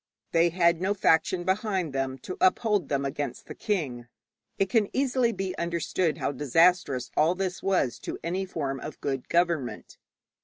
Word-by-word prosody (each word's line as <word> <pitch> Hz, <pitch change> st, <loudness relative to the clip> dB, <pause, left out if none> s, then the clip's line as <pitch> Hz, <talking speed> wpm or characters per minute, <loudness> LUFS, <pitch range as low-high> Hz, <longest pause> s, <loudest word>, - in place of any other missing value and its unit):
They 170 Hz, +1 st, +4 dB
had 170 Hz, -1 st, +2 dB
no 195 Hz, +2 st, +1 dB
faction 175 Hz, 0 st, +2 dB
behind 190 Hz, -4 st, -1 dB
them 135 Hz, -1 st, -2 dB
to 185 Hz, -, -5 dB
uphold 200 Hz, -2 st, +2 dB
them 140 Hz, -1 st, 0 dB
against 135 Hz, -2 st, -4 dB
the -, -, -8 dB
king. 135 Hz, -, -3 dB, 0.5 s
It 195 Hz, -, +2 dB
can 210 Hz, 0 st, +2 dB
easily 255 Hz, -3 st, +2 dB
be 190 Hz, -3 st, -4 dB
understood 170 Hz, -1 st, -1 dB
how -, -, -1 dB
disastrous 145 Hz, -1 st, +2 dB
all 160 Hz, +4 st, +3 dB
this 185 Hz, -1 st, -3 dB
was 185 Hz, -11 st, +1 dB
to -, -, -5 dB
any 185 Hz, +4 st, -2 dB
form 140 Hz, -6 st, -3 dB
of 155 Hz, -, -8 dB
good 135 Hz, -2 st, -3 dB
government. 170 Hz, -7 st, -1 dB
170 Hz, 160 wpm, -27 LUFS, 140-190 Hz, 0.5 s, They